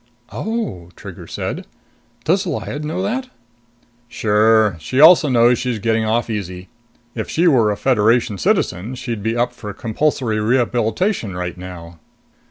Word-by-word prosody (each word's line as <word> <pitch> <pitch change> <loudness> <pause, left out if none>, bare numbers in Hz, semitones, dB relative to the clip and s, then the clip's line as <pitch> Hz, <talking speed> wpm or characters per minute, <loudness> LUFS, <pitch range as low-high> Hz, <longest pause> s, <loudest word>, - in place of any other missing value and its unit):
"Oh," 215 - -4
Trigger - - -10
said. - - -5 0.6
"Does 190 +4 +1
Lyad 150 -2 -4
know 165 +5 -3
that?" 255 +6 -2 0.8
"Sure. 110 -2 +3
She 130 +12 -2
also 160 -1 +7
knows 120 -1 +4
she's 125 -3 -2
getting 110 +1 0
off 115 +2 0
easy. 95 -4 -5 0.4
If 110 - -5
she 170 +2 +2
were 120 -9 +4
a 105 - -1
Federation 115 -3 +2
citizen, 95 - 0
she'd 120 -4 -5
be 110 +3 -1
up 120 +1 0
for 105 - -8
compulsory 115 -1 -1
rehabilitation 120 - 0
right 90 -1 -4
now." 85 -2 -10
115 Hz, 140 wpm, -19 LUFS, 105-135 Hz, 0.8 s, also